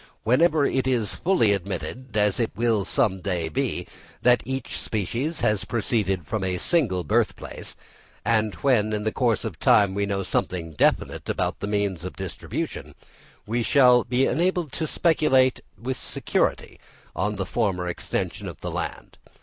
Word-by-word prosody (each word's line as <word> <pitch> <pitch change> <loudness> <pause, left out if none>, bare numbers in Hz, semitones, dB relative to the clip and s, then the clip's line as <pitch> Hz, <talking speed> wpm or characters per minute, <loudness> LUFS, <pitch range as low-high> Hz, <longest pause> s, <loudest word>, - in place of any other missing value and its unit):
Whenever 150 +4 +4
it 130 -1 0
is 115 -6 +1
fully 165 - +2
admitted, 110 +5 -5
as 105 +1 +2
it 115 - +1
will 115 -3 +1
some 105 -6 +1
day 90 -4 -2
be, 75 - -2 0.4
that 125 0 +5
each 130 -1 -3
species 115 - -2
has 105 -2 +1
proceeded 100 -6 -1
from 105 +5 -2
a 90 -1 -1
single 100 - +1
birthplace, 75 - -2 0.5
and 110 -2 +1
when 110 -6 +3
in 105 0 -1
the 110 - 0
course 115 -5 +1
of - - -5
time 100 -2 +4
we 100 +1 -1
know 100 -1 -1
something 85 -3 -2
definite 75 - +1
about - - -1
the 100 - -3
means 100 -4 -1
of 90 - -6
distribution, 95 -4 -5 0.5
we 115 +3 -1
shall 125 -1 +5
be 125 +2 +1
enabled 175 -2 0
to 160 +2 -3
speculate 135 -7 +3 0.2
with 125 +2 -4
security - - -1 0.4
on 105 +1 -1
the 95 -1 -2
former 95 -4 -1
extension 90 - -3
of - - -8
the - - -4
land. - - -5
110 Hz, 160 wpm, -25 LUFS, 95-130 Hz, 0.5 s, that